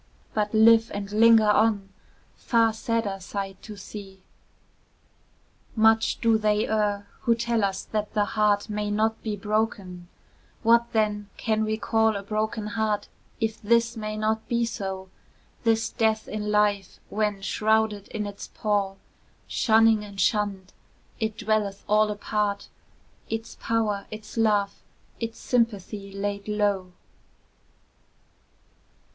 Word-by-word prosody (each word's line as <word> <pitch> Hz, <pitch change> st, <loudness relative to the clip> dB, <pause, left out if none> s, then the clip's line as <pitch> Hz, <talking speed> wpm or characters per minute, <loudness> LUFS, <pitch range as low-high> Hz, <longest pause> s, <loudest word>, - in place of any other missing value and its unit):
But 210 Hz, -1 st, 0 dB
live 225 Hz, +1 st, +6 dB
and 200 Hz, 0 st, -5 dB
linger 220 Hz, 0 st, +6 dB
on, 210 Hz, -2 st, +2 dB, 0.4 s
far 230 Hz, -2 st, +2 dB
sadder 220 Hz, -2 st, -1 dB
sight 195 Hz, 0 st, -5 dB
to 215 Hz, -, -9 dB
see; 195 Hz, -1 st, -10 dB, 1.5 s
Much 220 Hz, 0 st, +3 dB
do 225 Hz, -1 st, +3 dB
they 210 Hz, 0 st, +1 dB
err, 205 Hz, -2 st, 0 dB
who 235 Hz, -2 st, +2 dB
tell 235 Hz, -1 st, 0 dB
us 195 Hz, -1 st, -1 dB
that 210 Hz, 0 st, -4 dB
the 210 Hz, -1 st, +3 dB
heart 205 Hz, -1 st, +1 dB
May 210 Hz, 0 st, -2 dB
not 220 Hz, +2 st, 0 dB
be 215 Hz, -2 st, -3 dB
broken; 205 Hz, -4 st, -2 dB, 0.6 s
what, 235 Hz, +1 st, +4 dB
then, 210 Hz, -2 st, 0 dB
can 220 Hz, -1 st, 0 dB
we 215 Hz, 0 st, -1 dB
call 220 Hz, 0 st, +2 dB
A 200 Hz, -, -4 dB
broken 215 Hz, +1 st, -2 dB
heart, 215 Hz, -1 st, -1 dB, 0.3 s
if 220 Hz, -1 st, -2 dB
this 230 Hz, +2 st, +2 dB
may 215 Hz, -1 st, -4 dB
not 220 Hz, +1 st, -1 dB
be 235 Hz, -1 st, +1 dB
so, 190 Hz, -4 st, -5 dB, 0.6 s
This 225 Hz, -1 st, +2 dB
death 220 Hz, -1 st, 0 dB
in 210 Hz, 0 st, -4 dB
life, 205 Hz, -2 st, +1 dB
when, 205 Hz, -2 st, -1 dB
shrouded 215 Hz, -1 st, +1 dB
in 210 Hz, -1 st, -4 dB
its 205 Hz, 0 st, -7 dB
pall, 200 Hz, -2 st, -1 dB, 0.5 s
Shunning 225 Hz, -1 st, +3 dB
and 200 Hz, -1 st, -10 dB
shunned, 195 Hz, -1 st, 0 dB, 0.5 s
it 220 Hz, -1 st, -2 dB
dwelleth 210 Hz, -2 st, -1 dB
all 215 Hz, +1 st, +4 dB
apart, 205 Hz, -1 st, -2 dB, 0.6 s
Its 225 Hz, 0 st, -4 dB
power, 215 Hz, -3 st, 0 dB
its 215 Hz, 0 st, -9 dB
love, 210 Hz, -3 st, +1 dB, 0.4 s
its 230 Hz, -1 st, -4 dB
sympathy 210 Hz, -4 st, -1 dB
laid 200 Hz, +1 st, -4 dB
low? 205 Hz, -3 st, 0 dB
215 Hz, 130 wpm, -26 LUFS, 205-220 Hz, 1.5 s, live